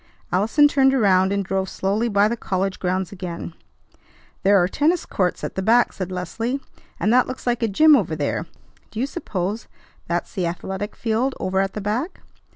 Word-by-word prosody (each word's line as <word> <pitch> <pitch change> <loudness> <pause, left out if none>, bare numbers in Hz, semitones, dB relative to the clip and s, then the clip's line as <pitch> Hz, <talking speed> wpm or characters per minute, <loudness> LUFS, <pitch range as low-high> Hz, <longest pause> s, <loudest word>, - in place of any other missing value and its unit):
Allison 220 - +4
turned 270 -2 +3
around, 190 -5 +3
and 200 -1 -1
drove 190 0 -1
slowly 210 +5 -1
by 200 0 +4
the 235 - -1
college 195 -3 -2
grounds 185 -1 -1
again. 175 -3 -6 0.9
"There 200 +1 +5
are 175 -1 +3
tennis 310 - +1
courts 180 -2 -1
at - - -3
the 190 - -3
back," 235 +5 +3
said 185 -1 -5
Leslie, 225 +9 -3 0.4
"and 215 - +2
that 250 0 +4
looks 255 - -7
like 245 -1 0
a 230 - +2
gym 305 +9 +6
over 180 - 0
there. 155 +2 -2 0.4
Do 220 - -7
you 255 - +1
suppose 210 - -4 0.4
that's 175 +1 -2
the 180 -3 -1
athletic 190 +4 -5
field 240 +4 -1
over 190 +1 0
at 195 0 0
the 210 - -4
back?" 230 - -3
200 Hz, 185 wpm, -22 LUFS, 185-240 Hz, 0.9 s, gym